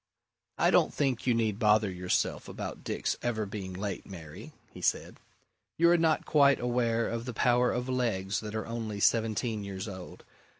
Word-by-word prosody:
"I - - +3
don't - - +4
think 130 -4 -1
you 120 - +4
need 110 -3 0
bother 105 -2 +3
yourself 90 0 -1
about - - -6
Dick's - - -2
ever 110 -3 -1
being 100 -2 -6
late, 100 +2 -4
Mary," 80 -6 -10 0.2
he - - -10
said. - - -1 0.6
"You 170 +1 +5
are 175 - +5
not 160 -1 +2
quite 140 -2 +4
aware 120 -2 +1
of 115 0 -4
the 125 -3 -5
power 125 +1 +3
of 125 +1 -2
legs 110 -7 -1
that 110 0 -6
are 110 - -2
only 115 -3 -4
seventeen 110 0 +1
years 100 +1 -5
old. 95 -3 -9
110 Hz, 175 wpm, -30 LUFS, 100-125 Hz, 0.6 s, You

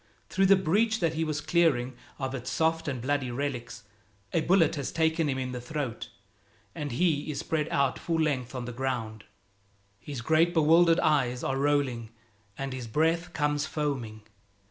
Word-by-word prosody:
Through 190 0 +3
the 195 - +7
breach 210 +5 +1
that 165 -3 +1
he 160 0 -1
was 155 -1 -2
clearing 150 -6 +2 0.2
of 135 -1 -3
its 130 -1 -5
soft 165 0 0
and 130 -4 -3
bloody 140 -1 0
relics, 125 -4 -4 0.5
a 165 - +2
bullet 170 -1 +3
has 140 -4 -3
taken 160 -1 +1
him 135 - -1
in 130 -1 -3
the 125 -1 -5
throat, 125 -4 -4 0.6
and 145 -2 -4
he 155 +1 +1
is 150 - -3
spread 155 -1 -1
out 140 -2 +1
full 165 -1 -1
length 135 -5 -1
on 125 -1 -4
the 125 - -5
ground. 115 -4 -3 0.7
His 140 +2 -6
great 160 +6 +2
bewildered 165 +2 +5
eyes 130 -5 +1
are 135 - 0
rolling 140 -5 0 0.5
and 135 -1 -4
his 125 -2 -6
breath 165 +7 +1
comes 150 0 0
foaming. 125 -8 -3
145 Hz, 170 wpm, -28 LUFS, 125-160 Hz, 0.7 s, the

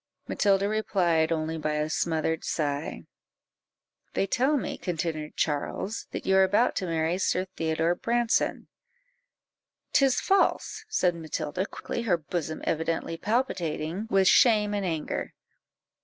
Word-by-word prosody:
Matilda 200 -1 +2
replied 175 -7 +1
only 160 0 -1
by 155 0 -1
a 150 0 0
smothered 160 0 -1
sigh. 145 -1 -2 1.1
"They - - +2
tell 265 +9 +2
me," - - -4
continued 160 -3 -3
Charles, 160 +8 -2
"that - - -6
you 190 0 +4
are 190 - +7
about 205 +6 +2
to 185 - -1
marry 165 +2 0
Sir 185 -1 +1
Theodore 160 +1 +1
Branson?" 235 +5 0 1.3
"'Tis 270 -2 +4
false," 395 +2 +1
said 180 - +2
Matilda, 160 +2 -3
quickly, - - -5
her 200 -7 +2
bosom 160 0 -4
evidently 165 +1 -1
palpitating 180 -4 -1
with 195 -1 +4
shame 210 -3 +5
and 200 -2 -1
anger. 160 -3 -3
175 Hz, 125 wpm, -27 LUFS, 160-205 Hz, 1.3 s, are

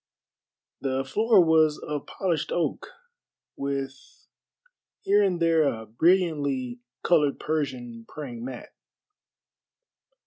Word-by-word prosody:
The 135 0 -1
floor 210 - +4
was 160 -2 +4
of 150 -2 -5
polished 170 -6 -2
oak, 175 - -1 0.7
with 140 -1 -3 1.1
here 205 +1 +4
and 190 -4 +1
there 165 -1 +3
a 110 -4 -3
brilliantly 140 - +1 0.2
colored 150 -5 +3
Persian 125 -7 -3
praying 125 -6 -7
mat. 125 -1 -7
145 Hz, 95 wpm, -26 LUFS, 130-170 Hz, 1.1 s, floor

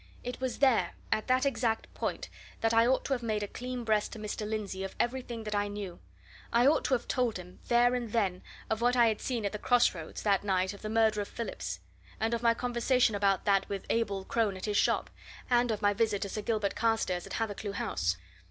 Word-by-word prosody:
It 245 +1 -5
was 260 -1 -2
there, 265 -5 +3 0.2
at 215 - 0
that 255 +1 +3
exact 235 -4 0
point, - - -3 0.3
that 225 0 +2
I 230 +1 +5
ought 260 +1 +2
to 275 - 0
have 250 - -1
made 215 -3 -1
a - - -3
clean 250 +2 -5
breast 215 -2 +1
to - - -7
Mr. 210 0 -4
Lindsey 205 -3 -3
of 195 - -6
everything 240 -2 -2
that 210 -1 -4
I 205 0 +1
knew. 205 -3 -6 0.5
I 235 +1 +4
ought 290 +3 +4
to 265 - +3
have 240 - -5
told 245 -5 0
him, 180 0 -11
there 240 +1 +4
and 240 -3 -2
then, 195 -6 0 0.3
of 220 +1 -1
what 245 +1 +3
I 235 -2 +6
had 215 - -2
seen 235 -5 -2
at 200 - 0
the 210 - -5
cross 245 +1 +4
roads 165 -3 -7
that 200 -2 +2
night 190 -1 +1
of 200 - -12
the 215 - -4
murder 220 -1 +3
of 200 - -4
Phillips; 90 - -5 0.4
and 225 +1 0
of 230 - -1
my 230 -1 +4
conversation 245 0 +2
about 200 -2 +1
that 195 -1 +2
with 200 -1 -4
Abel 200 -4 0
Crone 215 -4 0
at 185 - -5
his 210 -1 -1
shop; - - +2 0.4
and 245 0 +4
of 215 -2 -2
my 205 0 +4
visit 210 -1 +1
to 200 - -4
Sir 215 - -3
Gilbert 210 -2 0
Carstairs 220 -6 0
at - - -8
Hathercleugh 210 -2 -3
House. 85 - -1
220 Hz, 235 wpm, -30 LUFS, 200-240 Hz, 0.5 s, I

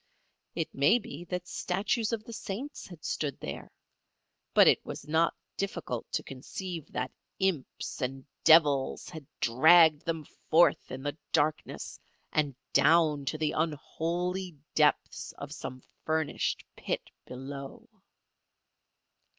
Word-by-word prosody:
It - - -2
may 145 - +5
be 175 -7 -8
that 180 0 -4
statues 210 +6 0
of 225 -2 -2
the 230 - -9
saints 235 +8 -6
had 175 -4 -12
stood 145 -3 -2
there, - - -6 0.9
but - - +8
it - - +5
was - - -7
not 160 +2 +2 0.2
difficult 170 -11 -3
to - - 0
conceive 165 +5 -6
that 125 0 -2 0.3
imps 190 -8 -2
and 135 +1 -3 0.2
devils 150 -5 +5
had 155 -4 -9
dragged 155 +5 +6
them 160 -2 -2 0.2
forth 170 +2 +5
in 135 - -6
the 145 -1 -2 0.2
darkness 155 -1 0 0.3
and 145 -4 +1 0.2
down 155 -2 +4
to 155 - -1
the 155 -1 0
unholy 170 +3 -2 0.2
depths 150 -1 +2
of 140 +1 -7
some 130 -3 -7 0.2
furnished 155 -2 -1
pit - - -4 0.2
below. 140 - -8
155 Hz, 125 wpm, -30 LUFS, 140-175 Hz, 0.9 s, but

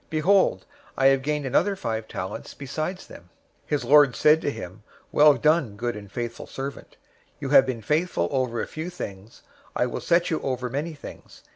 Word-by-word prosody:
Behold, 185 +5 +2 0.3
I 135 - +2
have 135 -1 +2
gained 150 +1 -2
another 180 +10 +2
five 110 - -4
talents 95 0 -6
besides 155 +7 -5
them.' 85 - -13 0.4
025:021 - - -36
"His 150 - -1
lord 145 -3 +5
said 155 +1 +4
to - - -1
him, 95 -6 -8 0.3
'Well 150 -1 +6
done, 155 -9 +2
good 120 +2 -3
and 100 -2 -10
faithful 120 0 -5
servant. 135 +1 -7 0.4
You 140 -2 -4
have 135 -2 +6
been 120 -4 -4
faithful 150 - 0
over 125 -3 -1
a - - -1
few 160 +3 -6
things, 105 - -9 0.3
I - - +2
will 125 - -4
set 175 0 +2
you 160 - -1
over 125 -2 -3
many 155 +5 -3
things. 145 - -12
135 Hz, 185 wpm, -25 LUFS, 120-155 Hz, 0.4 s, Well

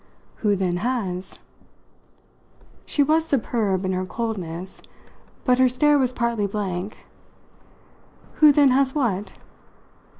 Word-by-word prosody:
"Who, 210 -2 +1
then, 185 -2 -1
has?" 195 -5 -3 1.5
She 290 - +2
was 315 +3 +2
superb 220 - 0
in 185 - -1
her 185 0 -1
coldness, 185 -6 -5 0.6
but 250 -1 +3
her 260 -1 +5
stare 290 +4 +3
was 255 -2 +2
partly 235 -4 -1
blank. 195 -1 -5 1.3
"Who 305 -1 +7
then 285 -1 +5
has 265 +1 +2
what?" 210 -8 -1
225 Hz, 110 wpm, -23 LUFS, 190-260 Hz, 1.5 s, Who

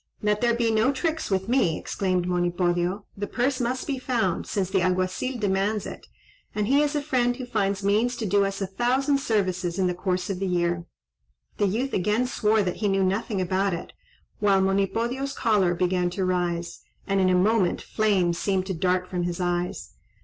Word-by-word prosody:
"Let 210 0 +1
there 235 -1 +3
be 235 -1 +1
no 220 +4 +3
tricks 320 +3 -2
with 190 0 0
me," 230 -10 +2
exclaimed 185 -2 -1
Monipodio; 175 +2 0
"the 205 +1 -4
purse 255 +3 0
must 250 +2 -1
be 275 -3 -2
found, 230 -9 -1
since 195 -3 -1
the 190 - +2
Alguazil 185 +8 0
demands 205 0 0
it, - - -9 0.5
and 210 -1 0
he 275 +6 +3
is 295 0 0
a 295 - 0
friend 245 -4 +1
who 255 0 -6
finds 200 -4 -1
means 220 +5 +2
to 235 - -4
do 200 0 +3
us 195 0 -2
a - - 0
thousand 255 +8 +1
services 185 -7 -1
in 190 - +2
the 180 - +1
course 180 0 -2
of 185 - -4
the 195 - -1
year." 175 -1 0 0.7
The 205 - +2
youth 240 +8 -1
again 210 +6 +1
swore 220 -4 +2
that 180 -2 -2
he 210 - 0
knew 195 -1 +2
nothing 195 +2 -1
about 185 +1 0
it, 170 - -8 0.5
while 200 -2 +3
Monipodio's 225 +8 0
choler 205 -7 +2
began 180 0 +1
to 190 - +1
rise, 175 -2 -1 0.3
and 195 0 +1
in 185 - +3
a 185 - +3
moment 195 0 +2
flames 190 -6 +1
seemed 190 -2 0
to 190 - -3
dart 180 +1 0
from 180 -1 -3
his 175 0 -2
eyes. 175 0 -2
195 Hz, 195 wpm, -25 LUFS, 180-230 Hz, 0.7 s, there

